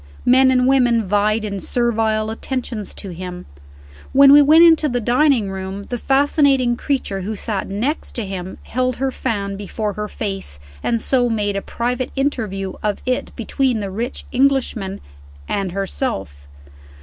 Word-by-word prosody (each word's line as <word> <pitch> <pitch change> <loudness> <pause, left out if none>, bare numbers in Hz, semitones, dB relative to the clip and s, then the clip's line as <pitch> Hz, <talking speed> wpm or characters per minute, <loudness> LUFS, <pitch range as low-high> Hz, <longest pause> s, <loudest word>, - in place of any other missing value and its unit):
Men 260 +1 +5
and 250 -1 +3
women 245 -5 +3
vied 210 +2 +1
in 200 -2 -4
servile 220 -1 0
attentions 235 -2 -4
to 195 - -7
him. 180 +1 -7 0.7
When 275 +1 +8
we 290 +1 +9
went 310 +4 +7
into 320 -2 +5
the 245 -1 0
dining 245 -3 +2
room, 190 +1 -5
the 245 - -2
fascinating 270 -2 +3
creature 240 -8 -2
who 215 +4 -4
sat 205 -1 -3
next 235 +11 -3
to 230 - -3
him 190 -1 -6
held 255 0 -1
her 265 +1 -1
fan 200 -6 -3
before 205 +1 -3
her 210 0 -4
face, 195 - -5 0.2
and 230 -1 0
so 245 +1 +1
made 205 -3 -1
a 195 - -1
private 245 +4 -3
interview 215 -9 -2
of 210 -1 -2
it 255 0 -1
between 250 0 0
the 200 -2 -4
rich 230 +6 -4
Englishman 250 -7 0 0.5
and 195 -2 -2
herself. 100 - -4
225 Hz, 155 wpm, -20 LUFS, 200-260 Hz, 0.7 s, we